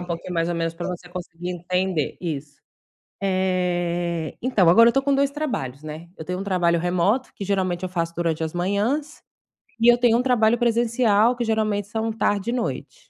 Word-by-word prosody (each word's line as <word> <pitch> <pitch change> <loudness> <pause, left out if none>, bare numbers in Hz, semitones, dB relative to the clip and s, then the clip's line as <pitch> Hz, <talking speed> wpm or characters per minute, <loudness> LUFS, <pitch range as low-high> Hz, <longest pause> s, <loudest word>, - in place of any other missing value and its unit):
um 180 - -5
pouquinho 170 +1 -5
mais 165 0 0
ou 175 - -1
menos 165 0 -2
pra 175 - -5
você 180 -1 -6
conseguir 175 0 -6
entender 180 -2 -1
isso. 145 -4 -5 0.6
Eh, 175 -3 -1
então, 215 -9 +3
agora 230 +6 +7
eu - - 0
tô 270 - +3
com 280 0 +1
2 280 0 +2
trabalhos, 155 - -4
né. 155 +2 -8
Eu - - -7
tenho 180 +1 -3
um - - -3
trabalho 175 -3 +1
remoto, 180 +9 +1
que - - -7
geralmente 185 -2 -1
eu 185 - -2
faço 170 -2 -2
durante 165 -2 -1
as 160 +1 -4
manhãs, 210 - -1 0.6
e 235 +1 +7
eu 240 - +3
tenho 240 -1 +4
um - - +2
trabalho 240 -3 +3
presencial, 235 -1 +3
que 245 - -2
geralmente 215 -3 0
são 220 +1 -2
tarde 205 -1 0
e - - -2
noite. 240 -2 -4
185 Hz, 195 wpm, -23 LUFS, 170-230 Hz, 0.6 s, agora